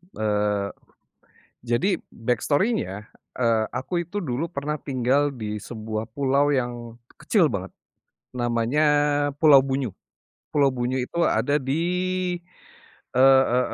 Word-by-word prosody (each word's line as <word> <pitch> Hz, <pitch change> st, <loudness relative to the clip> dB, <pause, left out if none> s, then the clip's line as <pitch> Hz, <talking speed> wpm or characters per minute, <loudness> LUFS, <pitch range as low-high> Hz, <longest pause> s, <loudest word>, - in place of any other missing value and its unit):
eee, 105 Hz, -2 st, 0 dB, 1.0 s
jadi 120 Hz, +11 st, +1 dB, 0.2 s
backstory-nya, 125 Hz, -, -1 dB, 0.3 s
eee, 115 Hz, -2 st, +2 dB
aku 170 Hz, +8 st, -2 dB
itu 190 Hz, +5 st, -5 dB
dulu 155 Hz, -1 st, -3 dB
pernah 145 Hz, +2 st, -3 dB
tinggal 140 Hz, 0 st, 0 dB
di 105 Hz, -4 st, -5 dB
sebuah 110 Hz, -1 st, -5 dB
pulau 140 Hz, +3 st, +2 dB
yang 120 Hz, -3 st, -3 dB, 0.2 s
kecil -, -, +3 dB
banget. -, -, -4 dB, 0.6 s
Namanya 120 Hz, +4 st, 0 dB, 0.6 s
Pulau 145 Hz, -4 st, +7 dB
Bunyu, 135 Hz, -6 st, -2 dB, 0.6 s
Pulau 140 Hz, -2 st, +4 dB
Bunyu 130 Hz, 0 st, -2 dB
itu 125 Hz, -, -6 dB
ada 145 Hz, 0 st, +2 dB
di, 135 Hz, +4 st, -1 dB, 1.3 s
e 130 Hz, -, +3 dB, 0.3 s
e 125 Hz, -, +4 dB
125 Hz, 110 wpm, -24 LUFS, 115-145 Hz, 1.3 s, Pulau